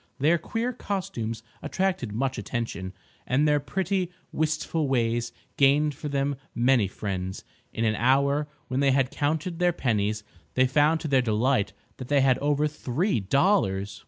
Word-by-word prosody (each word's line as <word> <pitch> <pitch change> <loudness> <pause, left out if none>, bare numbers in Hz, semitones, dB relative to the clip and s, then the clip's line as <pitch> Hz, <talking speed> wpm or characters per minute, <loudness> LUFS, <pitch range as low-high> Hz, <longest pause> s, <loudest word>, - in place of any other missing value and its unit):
Their 155 +5 +3
queer 230 +8 -2
costumes 115 - -4 0.2
attracted 185 - -1
much 130 +3 -1
attention, 100 -3 -4 0.4
and 140 +4 +2
their 150 0 +3
pretty, 185 +4 -1 0.2
wistful 155 0 -1
ways 120 -2 0 0.3
gained 145 +2 +4
for 145 +2 -6
them 140 0 0 0.2
many 120 -3 +3
friends. 95 -1 -4 0.3
In 115 - -1
an 110 - +2
hour, 140 +6 +2 0.2
when 130 +1 -1
they 140 -1 +4
had 135 -1 +2
counted 160 +4 -1
their 175 0 +3
pennies, 105 -6 0 0.3
they 130 - +5
found 150 +5 +3
to - - -3
their 135 -3 +4
delight 110 -2 +1 0.2
that 130 - -7
they 145 0 +3
had 130 -1 +3
over 145 +1 +1
three 150 - -1
dollars. 100 - +1
135 Hz, 155 wpm, -26 LUFS, 115-150 Hz, 0.4 s, they